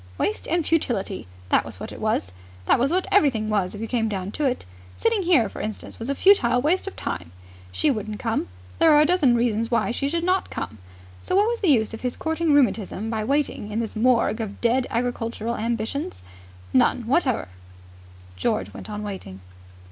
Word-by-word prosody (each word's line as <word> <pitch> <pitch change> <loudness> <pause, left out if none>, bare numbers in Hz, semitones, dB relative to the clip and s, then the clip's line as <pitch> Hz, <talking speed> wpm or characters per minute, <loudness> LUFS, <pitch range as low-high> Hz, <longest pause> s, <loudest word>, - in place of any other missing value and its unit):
Waste 215 - -1
and 335 -1 0
futility! 220 - -1 0.2
That - - +4
was - - -10
what - - -6
it - - -9
was. 90 - 0 0.3
That - - +4
was 265 +3 +2
what 365 +2 +1
everything 245 - +3
was, 200 -2 0
if 205 - -7
you - - -2
came 225 -2 0
down 195 -1 -3
to 295 - -2
it. 255 -2 -1 0.3
Sitting 455 -3 +2
here, 335 - +4
for - - -7
instance, 215 0 -6
was 230 +3 -4
a 280 - 0
futile 260 -10 +5
waste 330 +9 +1
of 390 - -5
time. 90 -2 -5 0.4
She 295 - +2
wouldn't 215 -3 -4
come. 225 0 -1 0.3
There 325 - +6
were 295 -1 +7
a - - +5
dozen 300 -8 +3
reasons 230 -1 +1
why 235 0 +1
she 275 +3 -1
should 335 +2 -1
not 370 +2 +1
come. 110 - -6 0.4
So - - -2
what 410 +2 +4
was 475 0 -2
the 390 - 0
use 230 -8 +3
of 225 - -7
his 250 -1 -2
courting 320 0 0
rheumatism 225 -5 +1
by 220 -1 -1
waiting 275 -4 -1
in 215 +2 -2
this 230 -2 -3
morgue 230 0 +2
of 205 -2 -6
dead 245 +2 +2
agricultural 235 -1 -2
ambitions? 225 - -3 0.5
None 220 - +3
whatever 255 - +1 0.9
George 95 +2 -1
went - - -9
on 210 0 -5
waiting. 190 - -7
235 Hz, 200 wpm, -24 LUFS, 215-295 Hz, 0.9 s, were